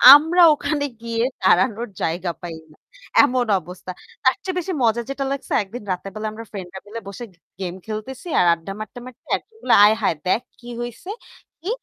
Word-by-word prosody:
আমরা 325 +4 +4
ওখানে 295 0 -1 0.2
গিয়ে 230 0 -1 0.2
দাঁড়ানোর 230 +3 +3
জায়গা 170 +2 -1
পাই 170 -2 -6 0.2
না। 155 - -20 0.5
এমন 255 -3 +2 0.2
অবস্থা। 180 +2 -8 0.3
তারচেয়ে 360 +8 +1
বেশি 365 +2 -3
মজা 230 0 +3
যেটা 275 0 -2
লাগছে 275 0 -3
একদিন 215 +4 -9
রাতের 185 +2 -4
বেলা 215 0 -3
আমরা 225 +1 -8
ফ্রেন্ডরা 190 -2 -7
মিলে 225 +2 -6
বসে 200 +4 -7 0.4
গেম 180 -2 -3
খেলতেছি 220 +9 -6
আর 180 - +5
আড্ডা 170 +3 -6
মারতে, 215 +4 -7
মারতে 255 +2 -13
একজন 450 - -21
বললো 250 - +3
"আয় 215 +1 +5
হায়! - - +2
দেখ 220 - +3 0.2
কি 240 - -13
হইছে? 240 - -7 0.5
কি?" 365 - -4
230 Hz, 180 wpm, -22 LUFS, 190-265 Hz, 0.5 s, আর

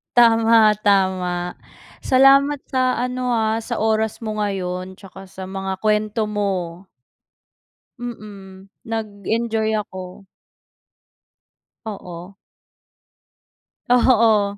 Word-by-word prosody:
Tama, 225 -2 +5
tama. 185 -3 0 0.4
Salamat 275 +2 +4
sa 255 -1 +1
ano 250 0 -2
ah, 220 0 0
sa 230 -1 -4
oras 220 0 0
mo 215 -1 -4
ngayon 185 -2 -3
tsaka 195 0 -13
sa 190 0 -9
mga 190 -1 -5
kwento 215 +1 +1
mo. 190 -3 -3 1.2
Mm, 200 -5 -9 0.2
nag-enjoy 220 0 -2
ako. 185 -1 -7 1.6
Oo. 185 -2 -8 1.5
Oo. 225 -5 +3
210 Hz, 80 wpm, -21 LUFS, 190-225 Hz, 1.6 s, Tama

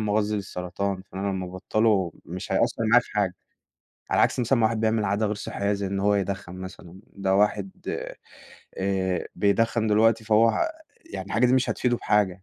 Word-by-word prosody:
مغذي 105 0 0
للسرطان، 95 0 -3
فإن 95 - -5
أنا 100 - -1
لما 95 -1 -2
أبطله 95 -1 +1
مش 90 +2 -6
هيأثر 115 - +1
معايا 120 +2 +6
في - - -16
حاجة. 100 -4 0 0.8
على - - +2
العكس - - +3
مثلًا 125 +2 +2
ما 110 - +4
واحد 110 0 -1
بيعمل 110 -1 +1
عادة 100 +2 +1
غير 105 - -1
صحية 100 0 -2
زي 100 -1 -2
إن 100 0 -2
هو 105 +1 +3
يدخن 100 -2 -3
مثلًا، 95 -1 -10
ده 95 -1 0
واحد 100 -1 +1 0.2
آآ، - - -4 0.6
آآ، 95 -1 -1
بيدخن 110 +3 +2
دلوقتي 110 +1 +3
فهو، 115 - +3 0.4
يعني - - -5
الحاجة 120 +3 +2
دي 125 - +2
مش 130 -1 +2
هتفيده 120 -1 +1
بحاجة 100 -4 +1
100 Hz, 185 wpm, -25 LUFS, 95-110 Hz, 0.8 s, معايا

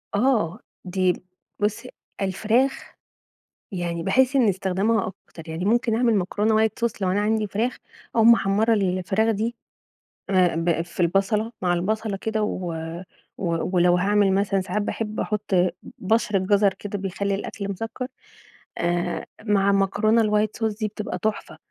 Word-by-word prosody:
آه، 215 -6 +1 0.3
دي 185 0 +1 0.5
بُصي، 210 +4 -1 0.3
الفراخ، 220 +7 0 0.8
يعني 170 -3 -3
باحس 260 +7 +3
إن 255 -4 +4
استخدمها 195 +3 0 0.2
أكتر، 165 -1 -12
يعني 165 +3 -3
ممكن 230 +1 +2
أعمل 235 -1 +3
مكرونة 215 +3 +2
white - - +2
sauce 235 -3 -2
لو 185 -1 +1
أنا 200 +2 +1
عندي 215 0 +1
فراخ 225 +5 -1 0.4
أو 225 - +4
محمرة 220 -1 +4
الفراخ 195 +2 +1
دي، 225 +3 -2 0.7
آآ 185 -3 +3
ب 165 0 +1
في 170 +1 -11
البصلة، 195 +5 +1
مع 180 -1 +2
البصلة 210 +3 -1
كده 220 +1 -1
و 180 -4 -3 0.6
ولو 175 0 +2
هاعمل 200 +1 +3
مثلًا 195 0 +1
ساعات 210 +3 -2
باحب 215 +1 -3
أحط 210 -1 -2
ب 180 0 +4 0.3
بَشرة 210 0 +1
جزر 200 +1 +3
كده 205 +1 -6
بيخلي 195 +1 -2
الأكل 200 0 -5
مسكّر، 225 +6 -4 0.7
آآ، 175 0 -1 0.2
مع 200 -2 +3
مكرونة 205 +3 +3
الwhite 210 0 +2
sauce 220 -2 0
دي 215 - 0
بتبقى 210 -3 -5
تحفة. 215 +2 -3
205 Hz, 145 wpm, -24 LUFS, 185-220 Hz, 0.8 s, إن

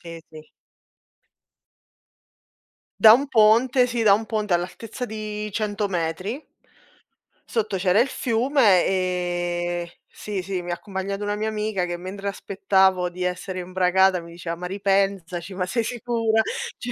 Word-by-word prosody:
Sì 165 -1 -9
sì. 155 -1 -12 2.5
Da 220 0 +9
un 275 +4 +2
ponte, 245 +2 +4
sì, 240 -1 -2
da 200 -2 +6
un 220 +2 0
ponte 210 -4 -1
all'altezza 215 +8 -3
di 215 -1 -5
100 205 -1 -2
metri. 185 - -3 1.1
Sotto 220 -3 -1
c'era 185 +3 +3
il 245 - +4
fiume 235 -5 +2
e 175 -2 -2 0.2
sì 205 -3 -5
sì, 185 0 -3
mi 175 0 -5
ha - - 0
accompagnato 195 +2 -5
una 205 0 -1
mia 215 +1 -2
amica 210 -4 -1
che 175 0 -4
mentre 195 +3 -7
aspettavo 190 -2 +1
di 180 +1 -6
essere 180 +1 -3
imbragata 185 +1 +2
mi 170 0 -12
diceva: 170 0 -6
"Ma 180 +1 -5
ripensaci, 195 -2 -1
ma 180 -1 -2
sei 230 +5 -1
sicura?" 230 -2 0 0.4
Cioè 245 - -5
195 Hz, 140 wpm, -23 LUFS, 180-215 Hz, 2.5 s, Da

